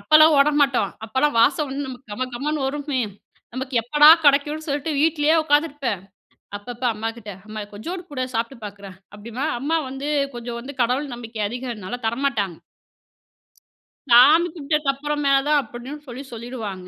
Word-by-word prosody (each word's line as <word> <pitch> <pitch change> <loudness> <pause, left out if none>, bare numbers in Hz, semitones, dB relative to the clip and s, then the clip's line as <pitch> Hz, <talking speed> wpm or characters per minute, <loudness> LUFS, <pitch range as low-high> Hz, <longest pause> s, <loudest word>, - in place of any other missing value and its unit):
அப்பலாம் 310 0 +6
ஓட 280 +2 +5
மாட்டோம். 255 -9 +2
அப்பலாம் 260 +6 0
வாசம் 290 +4 +3
வந்து 275 +2 -4
நமக்கு 260 0 -9
கம 255 +5 -2
கமன்னு 290 +2 -2
வருமே! 285 -1 -2 0.5
நமக்கு 260 0 -5
எப்படா 295 +5 +6 0.2
கிடைக்கும்னு 295 +3 +3
சொல்ட்டு 290 +2 -2
வீட்டிலேயே 310 0 +3
உட்காந்துருப்பேன். 290 - 0 0.6
அப்பப்ப 240 +4 -9
அம்மாகிட்ட, 225 -1 -5 0.2
"அம்மா 215 0 -6
கொஞ்சோடு 345 - -6
குடேன். 255 -2 -3
சாப்புட்டு 230 +3 -2
பார்க்குறேன்." 200 -2 -10 0.2
அப்பிடீம்பேன், 235 +8 -4
அம்மா 315 +5 0
வந்து 270 +3 -5 0.3
கொஞ்சம் 235 0 -5
வந்து 275 +4 -8
கடவுள் 255 +3 0
நம்பிக்கை 230 -2 -7
அதிகன்னால 240 -2 -6
தரமாட்டாங்க. 225 - -1 1.5
"சாமி 295 +8 +7
கும்பட்டதுக்கு 300 -2 0
அப்புறமா 295 0 -1 0.2
தான்." 300 -1 +4
அப்படின்னு 245 +6 -9
சொல்லி 255 +3 -7
சொல்லிடுவாங்க. 220 -6 -6
265 Hz, 140 wpm, -22 LUFS, 235-295 Hz, 1.5 s, சாமி